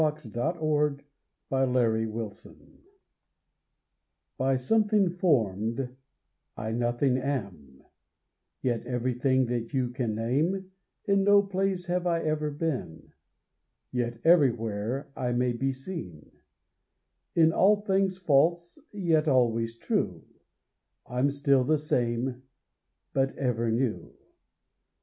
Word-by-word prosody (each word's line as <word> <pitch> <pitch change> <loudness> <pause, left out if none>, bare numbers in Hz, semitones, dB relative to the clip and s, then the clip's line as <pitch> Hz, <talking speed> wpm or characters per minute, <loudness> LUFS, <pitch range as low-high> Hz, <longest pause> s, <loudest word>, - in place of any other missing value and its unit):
ON 155 -1 +3
A - - -18
SHADOW 155 - -1
IN 145 -2 0 0.5
A 135 0 +2
GLASS; 110 -3 -1 1.9
By 135 +1 +2
something 205 - +2
form'd, 125 - 0 0.6
I 110 +1 -3
nothing 120 +3 +1
am, 100 - -5 0.8
Yet 120 -3 0
everything 125 +1 +1
that 120 +2 -3
you 125 -2 +1
can 120 -4 -2
name; 160 - -1 0.3
In 200 -2 +3
no 205 0 +6
place 195 -2 -1
have 180 0 -1
I 170 -1 +1
ever 155 -1 0
been, 145 - -4 0.8
Yet 120 -2 -2
everywhere 125 -6 +2
I 125 -1 -1
may 125 0 +1
be 135 +3 -1
seen; 130 - -8 1.0
In 160 -1 +5
all 205 +2 +4
things 195 -2 +1
false, 170 - +2
yet 165 -6 +1
always 115 -4 +2
true, - - -2 0.8
I'm 125 +3 0
still 140 -1 +2
the 155 +4 +2
same 125 -3 -1 0.7
but 135 0 0
ever 120 -4 0
new. 115 0 -2
135 Hz, 110 wpm, -28 LUFS, 120-165 Hz, 1.9 s, no